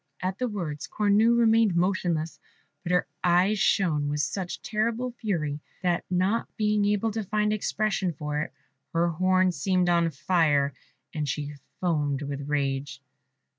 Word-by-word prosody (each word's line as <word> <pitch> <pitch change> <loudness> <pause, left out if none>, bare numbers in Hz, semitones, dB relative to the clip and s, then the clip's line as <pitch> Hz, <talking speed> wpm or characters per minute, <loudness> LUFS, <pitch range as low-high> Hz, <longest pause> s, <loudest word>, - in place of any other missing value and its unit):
At 185 +1 -3
the 250 - 0
words 165 -8 -4
Cornue 215 +3 +3
remained 225 -4 +4
motionless, 170 -3 0 0.4
but 175 - -4
her 180 - +3 0.2
eyes 180 +4 +3
shone 160 -8 +2
with 145 0 0
such 185 +2 -3
terrible 235 +2 -1
fury, 160 -11 -2 0.2
that, 175 -1 +1
not 185 +5 +1
being 210 -1 +2
able 210 +2 +1
to 220 +1 -2
find 210 +2 0
expression 210 -3 0
for 150 -1 -3
it, - - -4 0.4
her 170 +1 +2
horn 185 +2 +2
seemed 180 +3 +1
on 170 -1 +3
fire, 145 -2 +2 0.4
and 150 -2 -2
she 145 +2 -3 0.3
foamed 150 -5 0
with 140 0 -5
rage. 135 -2 -1
180 Hz, 145 wpm, -27 LUFS, 150-210 Hz, 0.4 s, remained